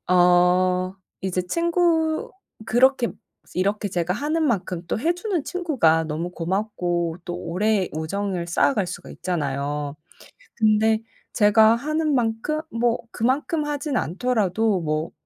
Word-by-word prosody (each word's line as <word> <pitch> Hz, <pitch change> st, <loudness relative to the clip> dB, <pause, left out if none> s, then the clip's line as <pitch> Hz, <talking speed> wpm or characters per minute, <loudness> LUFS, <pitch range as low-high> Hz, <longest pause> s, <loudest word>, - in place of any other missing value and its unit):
어 180 Hz, +1 st, +4 dB, 0.3 s
이제 185 Hz, -1 st, -1 dB
친구 335 Hz, -, +1 dB, 0.4 s
그렇게 250 Hz, +1 st, +3 dB, 0.5 s
이렇게 200 Hz, +3 st, 0 dB
제가 175 Hz, -1 st, -1 dB
하는 310 Hz, +6 st, -1 dB
만큼 180 Hz, -7 st, -1 dB
또 170 Hz, -, -2 dB
해주는 350 Hz, -, -1 dB
친구가 255 Hz, -, +2 dB
너무 160 Hz, +3 st, -3 dB
고맙고 175 Hz, -2 st, -2 dB
또 175 Hz, -1 st, -4 dB
오래 190 Hz, +3 st, 0 dB
우정을 175 Hz, +2 st, -2 dB
쌓아갈 195 Hz, +3 st, +2 dB
수가 180 Hz, -, -8 dB
있잖아요. 145 Hz, -4 st, -3 dB, 0.6 s
근데 220 Hz, 0 st, +3 dB, 0.3 s
제가 220 Hz, +1 st, +5 dB
하는 305 Hz, +4 st, -1 dB
만큼 240 Hz, +6 st, 0 dB
뭐 230 Hz, 0 st, +1 dB
그만큼 285 Hz, +7 st, 0 dB
하진 290 Hz, -2 st, -2 dB
않더라도 210 Hz, 0 st, 0 dB
뭐 155 Hz, +1 st, -2 dB
205 Hz, 250 characters per minute, -23 LUFS, 175-260 Hz, 0.6 s, 제가